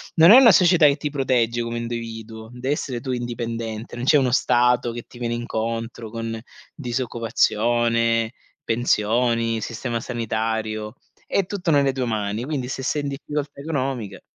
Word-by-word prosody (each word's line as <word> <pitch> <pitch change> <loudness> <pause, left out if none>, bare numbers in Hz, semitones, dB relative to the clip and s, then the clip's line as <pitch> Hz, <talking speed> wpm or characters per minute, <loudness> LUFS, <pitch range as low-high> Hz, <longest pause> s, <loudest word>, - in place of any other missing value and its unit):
non 165 +4 +8
è 250 - +11
una 245 -4 +8
società 175 -3 +5
che 140 - +3
ti 150 0 -4
protegge 125 -4 +1
come 115 0 -3
individuo. 115 -1 -6
Devi 130 +3 -1
essere 125 -5 -4
tu 130 - -4
indipendente. 115 -2 -4
Non 120 - -4
c'è 150 - +6
uno 130 -3 +2
stato 125 -1 +2
che 120 - -5
ti 120 - -16
viene 120 -1 -2
incontro 115 -1 -4
con 115 0 -5 0.3
disoccupazione, 115 -2 0 0.3
pensioni, 115 0 +1
sistema 115 +2 -3
sanitario, 110 -2 -3 0.3
è 200 - +1
tutto 180 -3 -2
nelle 140 -2 +4
tue 130 -1 -2
mani. 110 0 -2
Quindi 135 -4 -3
se 135 - -4
sei 145 +3 0
in 145 - -3
difficoltà 145 +1 -5
economiche 135 -7 -3
120 Hz, 155 wpm, -23 LUFS, 115-135 Hz, 0.3 s, è